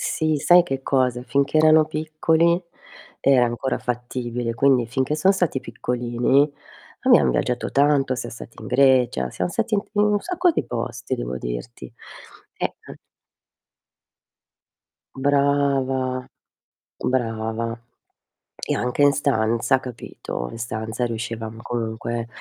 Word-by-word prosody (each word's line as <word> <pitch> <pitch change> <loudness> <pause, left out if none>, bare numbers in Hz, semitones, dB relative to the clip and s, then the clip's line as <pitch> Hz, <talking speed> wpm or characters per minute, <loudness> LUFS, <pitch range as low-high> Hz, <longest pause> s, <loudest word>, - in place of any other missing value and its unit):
Sì, 155 -2 0
sai 175 +5 +6
che 135 -5 -4
cosa? 125 -3 +1
Finché 140 +3 0
erano 155 0 +6
piccoli 160 +3 +1 0.6
era 130 -3 +4
ancora 120 +3 -2
fattibile, 120 -1 -3
quindi 130 -1 +3
finché 130 +5 -1
son 190 +5 +4
stati 175 -8 0
piccolini 125 +4 0 0.5
abbiam 65 - +5
viaggiato 120 - -1
tanto, 140 -2 +2
siam 120 -1 -5
stati 115 0 -11
in - - -8
Grecia, 125 - +3
siam - - -2
stati 220 +4 -1
in 200 - +1
t - - -29
in 205 - +3
un 210 -1 +2
sacco 360 0 +1
di - - -1
posti 120 0 -4
devo 60 +2 -4
dirti. - - -7 0.6
Eh, - - -3
an - - -10 2.2
Brava, 135 -2 +1 0.8
brava 115 -1 -2 0.8
e - - -3
anche 125 +4 0
in 145 - +7
stanza 120 -2 +1
capito. 115 - -7
In - - -8
stanza 110 +1 -3
riuscivamo 115 -1 -5
comunque, 115 0 -3
130 Hz, 125 wpm, -22 LUFS, 115-145 Hz, 2.2 s, in